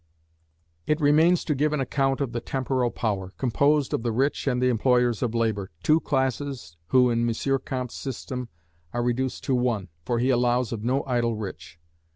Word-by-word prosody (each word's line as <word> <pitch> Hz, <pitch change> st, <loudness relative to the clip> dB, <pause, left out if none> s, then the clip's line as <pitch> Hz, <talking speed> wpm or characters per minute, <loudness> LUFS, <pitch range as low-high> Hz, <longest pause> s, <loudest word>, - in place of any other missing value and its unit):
It 150 Hz, +1 st, +2 dB
remains 160 Hz, +4 st, +4 dB
to 150 Hz, -, +1 dB
give 150 Hz, +2 st, +1 dB
an 150 Hz, -, 0 dB
account 135 Hz, +1 st, 0 dB
of 135 Hz, -4 st, -1 dB
the 120 Hz, -, -3 dB
Temporal 130 Hz, -1 st, -1 dB
Power, 100 Hz, -5 st, -3 dB
composed 140 Hz, +3 st, +2 dB
of -, -, 0 dB
the 120 Hz, 0 st, -1 dB
rich 135 Hz, +5 st, 0 dB
and 125 Hz, -2 st, +1 dB
the 125 Hz, -, +2 dB
employers 125 Hz, -1 st, +2 dB
of 120 Hz, -2 st, -1 dB
labour, 110 Hz, -4 st, 0 dB
two 155 Hz, +1 st, +4 dB
classes 135 Hz, -, -2 dB
who 125 Hz, +2 st, +4 dB
in 120 Hz, 0 st, +1 dB
M. 135 Hz, +4 st, 0 dB
Comte's 125 Hz, -2 st, -4 dB
system 125 Hz, -1 st, -5 dB, 0.4 s
are 120 Hz, 0 st, -1 dB
reduced 125 Hz, +2 st, -1 dB
to 135 Hz, -, 0 dB
one, 120 Hz, -7 st, 0 dB
for 120 Hz, +7 st, -1 dB
he 125 Hz, +3 st, +2 dB
allows 125 Hz, -1 st, +2 dB
of 110 Hz, -3 st, -4 dB
no 130 Hz, +4 st, +1 dB
idle 120 Hz, -3 st, 0 dB
rich. 95 Hz, -6 st, -8 dB
125 Hz, 185 wpm, -25 LUFS, 115-135 Hz, 0.4 s, remains